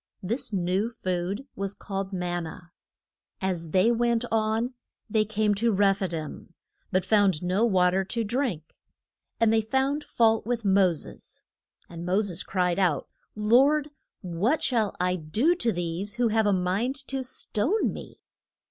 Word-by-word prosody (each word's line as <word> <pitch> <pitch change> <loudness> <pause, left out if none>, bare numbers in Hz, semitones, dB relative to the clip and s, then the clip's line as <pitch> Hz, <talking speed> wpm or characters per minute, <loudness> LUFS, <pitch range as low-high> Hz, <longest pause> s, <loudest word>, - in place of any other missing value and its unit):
This 225 +6 -2
new 190 +3 0
food 185 +2 -3
was 195 0 -3
called 195 -1 -5
man 175 -2 -2
na. 160 - -8 0.8
As 180 -4 -2
they 185 +8 +4
went 235 0 +1
on 225 +3 0 0.3
they 215 -1 +2
came 215 0 +1
to 230 +3 +1
Reph 195 -1 +3
i 190 - +1
dim, 160 -3 -7 0.4
but 185 -1 +1
found 200 -6 +3
no 185 +5 +1
wa 180 -5 +3
ter 190 +1 +1
to 230 +4 -2
drink. 220 - -2 0.6
And 225 -1 +4
they 225 - +4
found 265 +6 0
fault 225 -4 +2
with 235 -2 -2
Mo 190 -2 +4
ses. 155 - -9 0.4
And 170 0 -8
Mo 180 +3 +2
ses 185 -3 -4
cried 180 -1 0
out, 170 -8 +1 0.3
Lord, 270 +8 +3 0.3
what 195 - 0
shall 225 -6 +1
I 180 0 +1
do 210 - +1
to 240 -10 0
these, 175 +3 -3
who 240 -1 +2
have 220 -1 +2
a - - +4
mind 195 +8 0
to 270 -1 -1
stone 260 - 0
me? - - -10
205 Hz, 160 wpm, -27 LUFS, 180-230 Hz, 0.8 s, they